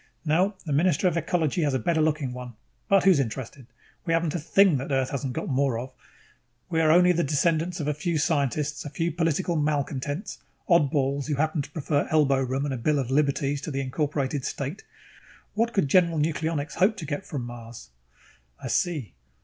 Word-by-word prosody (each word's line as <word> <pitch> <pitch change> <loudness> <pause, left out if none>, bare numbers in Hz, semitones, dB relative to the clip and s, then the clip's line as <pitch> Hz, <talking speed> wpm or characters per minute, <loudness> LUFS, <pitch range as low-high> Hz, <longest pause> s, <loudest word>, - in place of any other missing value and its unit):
No, 180 +7 +2
the 150 - -2
Minister 170 +4 +2
of 175 - +1
Ecology 170 0 0
has 145 -4 +1
a - - +3
better 160 +6 +1
looking 150 -4 0
one. 125 -1 -8 0.4
But 195 -2 +5
who's 190 -6 +5
interested? 130 0 -4 0.4
We 165 - 0
haven't 165 -2 +1
a 175 - -1
thing 180 +1 +4
that 135 +3 -5
Earth 135 -1 +1
hasn't 135 -2 -3
got - - -4
more 135 -3 +1
of. 130 +3 -6 0.8
We're 160 -1 +3
only 180 +3 +6
the 170 -1 +1
descendants 160 +4 0
of 150 - -3
a 150 - +1
few 165 +2 -2
scientists, 150 -1 0
a - - -6
few 165 +4 -2
political 165 +2 0
malcontents, 145 - -2 0.3
oddballs 140 -4 +2
who 150 - 0
happen 155 +2 0
to 135 - -8
prefer 145 -1 -1
elbow 145 -4 +3
room 135 +2 -1
and 140 - -2
a - - -3
bill 145 +6 +1
of 130 -2 -2
liberties 140 0 +1
to 155 - -5
the 135 -2 -2
incorporated 140 0 -2
state 140 +10 -4 0.7
what 230 +2 +1
could 195 -10 +1
General 170 +1 +3
Nucleonics 155 -1 -1
hope 205 +5 +3
to 170 - -6
get 145 +4 -4
from 145 -9 -5
Mars?" 115 - -10 0.7
"I - - -6
see. 155 - -1
150 Hz, 190 wpm, -26 LUFS, 135-165 Hz, 0.8 s, only